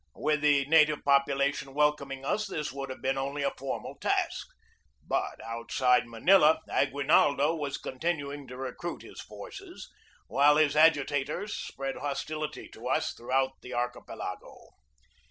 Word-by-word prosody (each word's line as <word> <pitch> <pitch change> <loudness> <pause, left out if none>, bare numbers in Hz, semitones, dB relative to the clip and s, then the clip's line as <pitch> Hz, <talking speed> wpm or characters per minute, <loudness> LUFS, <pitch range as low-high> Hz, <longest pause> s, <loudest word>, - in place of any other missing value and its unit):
With 150 0 0
the 145 -2 +4
native 150 0 +4
population 140 0 +2
welcoming 140 -2 0
us 215 +8 0
this 155 -6 -3
would 135 0 -6
have 130 - -8
been 135 0 0
only 140 +1 -3
a 140 - +1
formal 135 0 -5
task. - - 0 0.6
But - - -1
outside 120 +2 +1
Manila 160 +7 +5
Aguinaldo 145 +1 +3
was 145 -4 -3
continuing 145 -1 -3
to 125 0 -9
recruit 135 +6 -5
his - - -10
forces, 390 -3 -10 0.3
while 145 +2 +4
his 150 -1 +3
agitators 150 +5 +2
spread 135 0 -5
hostility 150 +2 -4
to 120 +3 -9
us 130 - 0
throughout 130 +2 -1
the 125 0 -7
archipelago. 120 0 -5
140 Hz, 135 wpm, -29 LUFS, 135-150 Hz, 0.6 s, Manila